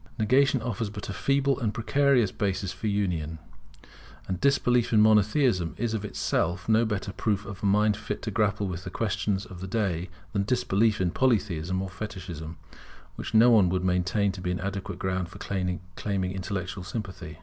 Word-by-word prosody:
Negation 130 +3 +3
offers 115 -2 -2
but 105 0 -7
a - - -2
feeble 140 +4 +1
and 110 -2 -1
precarious 125 -3 +3
basis 95 -2 -1
for 95 +3 -4
union: 90 -6 -1 0.9
and 95 -1 -3
disbelief 125 -4 +3
in 110 - +5
Monotheism 105 - +3
is 115 0 -1
of 110 -2 -2
itself 90 -3 -1
no 115 +1 +4
better 100 -2 -3
proof 105 -2 -1
of 100 -2 -8
a 100 - +1
mind 105 +1 +3
fit 110 - -5
to - - -3
grapple 105 -2 +1
with 90 -1 -5
the 95 - -5
questions 95 0 -1
of 95 -4 -10
the 95 - -5
day 95 -5 -1 0.2
than 100 - +1
disbelief 110 -1 +2
in 90 -2 +1
Polytheism 95 - +1
or 95 - -5
Fetichism, 90 -6 -7 0.6
which - - -5
no 115 +2 +7
one 105 -6 +6
would 90 0 0
maintain 95 +3 +1
to 90 -1 -8
be 90 - -2
an 90 0 -1
adequate 100 0 -4
ground 95 -2 -2
for - - -11
claiming 90 -3 -2 0.5
intellectual 95 0 -4
sympathy. 95 -5 -6
100 Hz, 180 wpm, -27 LUFS, 90-110 Hz, 0.9 s, no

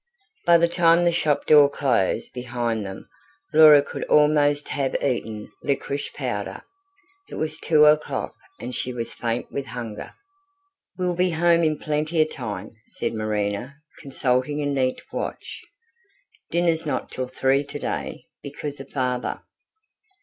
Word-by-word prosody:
By 170 0 +8
the 170 0 +3
time 170 0 +4
the 175 - +4
shop 150 -3 0
door 145 -2 +7
closed 125 -10 0
behind 120 -3 -2
them, 95 -1 -8 0.5
Laura 150 -2 +8
could - - -6
almost 150 -1 +3
have 135 -2 -1
eaten 110 -5 -2
liquorice 140 0 -2
powder. - - -4 0.7
It - - -8
was 155 0 -3
two 150 -2 +4
o'clock, 150 0 +2 0.3
and 125 +2 -6
she 125 - -2
was 115 -1 -4
faint 120 0 -3
with 140 -3 -4
hunger. 115 -3 -7 0.8
"We'll 180 -1 0
be 180 +1 +2
home 170 0 +3
in 155 -1 +1
plenty 155 +3 -1
of 155 0 +3
time," 105 -6 -6 0.2
said - - -3
Marina, 110 +3 -2 0.2
consulting 130 +1 0
a - - -1
neat 135 -2 0
watch. - - -5 0.9
"Dinner's 170 -1 +1
not 130 -3 -3
till 130 0 -3
three 135 +2 +1
today, 145 - -5 0.2
because 145 0 -6
of 135 0 -10
father." 125 -2 -2
140 Hz, 140 wpm, -24 LUFS, 125-155 Hz, 0.9 s, By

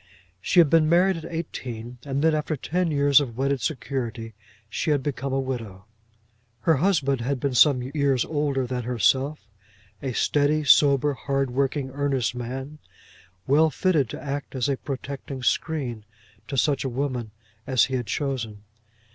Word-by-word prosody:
She 175 - +3
had 165 - +7
been 155 0 +4
married 180 +2 +4
at 165 +1 -8
eighteen, 125 -7 -6
and 140 +1 -2
then, 160 0 +4
after 155 +1 -1
ten 175 +6 -1
years 145 -1 +4
of 120 -5 -5
wedded 135 0 0
security, 120 -6 -3 0.3
she 135 +9 -2
had 145 -3 +2
become 135 -1 -3
a 135 - 0
widow. 115 -8 -5 0.8
Her 160 +4 +3
husband 140 -6 +1
had 135 +2 -1
been 140 0 -1
some 125 0 +5
years 135 -1 +1
older 145 -4 -1
than 125 0 -3
herself, 130 +4 0 0.5
a 130 -2 -3
steady, 150 +4 +2
sober, 145 0 +5
hardworking, 135 0 -1
earnest 135 -3 0
man, 130 +5 -6 0.7
well 155 +4 +4
fitted 155 - +1
to - - -6
act 140 -1 -5
as 130 +1 0
a 140 - +1
protecting 135 -1 -6
screen 125 -5 -1 0.4
to 135 - -4
such 145 +2 +2
a 135 - -2
woman 125 -3 -3 0.4
as 130 -3 +4
he 135 - -7
had 120 -3 -3
chosen. 115 -4 -3
135 Hz, 155 wpm, -25 LUFS, 125-150 Hz, 0.8 s, had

